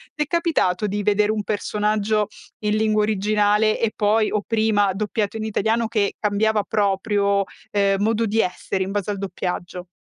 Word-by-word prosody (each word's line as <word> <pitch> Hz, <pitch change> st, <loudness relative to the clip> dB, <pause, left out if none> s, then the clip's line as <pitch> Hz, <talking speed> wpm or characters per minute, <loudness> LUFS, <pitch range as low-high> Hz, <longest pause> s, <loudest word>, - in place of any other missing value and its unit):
T'è 300 Hz, -, 0 dB
capitato 295 Hz, -, +1 dB
di 205 Hz, +1 st, -2 dB
vedere 210 Hz, +1 st, +2 dB
un 215 Hz, -1 st, -2 dB
personaggio 210 Hz, 0 st, 0 dB, 0.4 s
in 210 Hz, 0 st, +2 dB
lingua 215 Hz, -1 st, +2 dB
originale 210 Hz, +1 st, +2 dB
e 230 Hz, -2 st, +1 dB
poi 215 Hz, +1 st, +2 dB
o 210 Hz, -, 0 dB
prima 210 Hz, -3 st, +1 dB
doppiato 210 Hz, +1 st, -2 dB
in 215 Hz, -, -4 dB
italiano 220 Hz, -1 st, -4 dB, 0.3 s
che 210 Hz, -3 st, 0 dB
cambiava 210 Hz, 0 st, +1 dB
proprio, 200 Hz, -1 st, +1 dB, 0.3 s
ehm, 200 Hz, -1 st, +2 dB
modo 225 Hz, +2 st, +1 dB
di 220 Hz, +1 st, 0 dB
essere 190 Hz, 0 st, -3 dB
in 195 Hz, -, -5 dB
base 205 Hz, 0 st, -2 dB
al 200 Hz, -, -4 dB
doppiaggio. 180 Hz, -1 st, -5 dB
210 Hz, 160 wpm, -22 LUFS, 200-215 Hz, 0.4 s, vedere